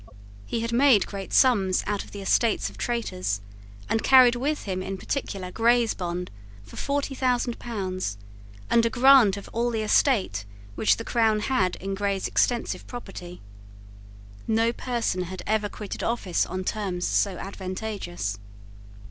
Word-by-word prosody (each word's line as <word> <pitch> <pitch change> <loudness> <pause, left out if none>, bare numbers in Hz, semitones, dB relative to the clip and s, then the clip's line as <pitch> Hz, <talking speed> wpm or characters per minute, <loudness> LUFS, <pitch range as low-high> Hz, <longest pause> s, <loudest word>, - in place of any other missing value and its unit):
He 230 - -2
had 230 0 -2
made 250 -4 +5
great 195 -2 -7
sums 200 -8 +3
out 205 -1 -2
of - - -15
the 200 -1 -8
estates 225 +3 +1
of - - -16
traitors, 100 - -2 0.5
and 225 - 0
carried 255 -2 +7
with 290 +5 -1
him 185 -2 -3
in 195 +1 -4
particular 190 -5 -4
Grey's 235 +1 +3
bond 180 0 -4 0.3
for 100 - -14
forty 280 0 -2
thousand 250 -2 0
pounds, 185 - -4 0.5
and 235 - +4
a 230 - +2
grant 245 -4 +6
of 200 - -9
all 235 +1 +1
the 225 -2 -2
estate 210 - +2 0.3
which 215 - +2
the 230 - -6
crown 220 -3 +2
had 195 -7 +1
in 195 +1 -5
Grey's 195 -1 -1
extensive 240 -2 0
property. 190 -7 -9 1.1
No 225 +1 +2
person 235 -8 -2
had 185 +1 -7
ever 215 -1 0
quitted 210 -1 -7
office 225 -7 0
on 185 +1 -4
terms 185 -3 -2
so 195 -3 +1
advantageous. 185 - -5
210 Hz, 150 wpm, -25 LUFS, 185-240 Hz, 1.1 s, carried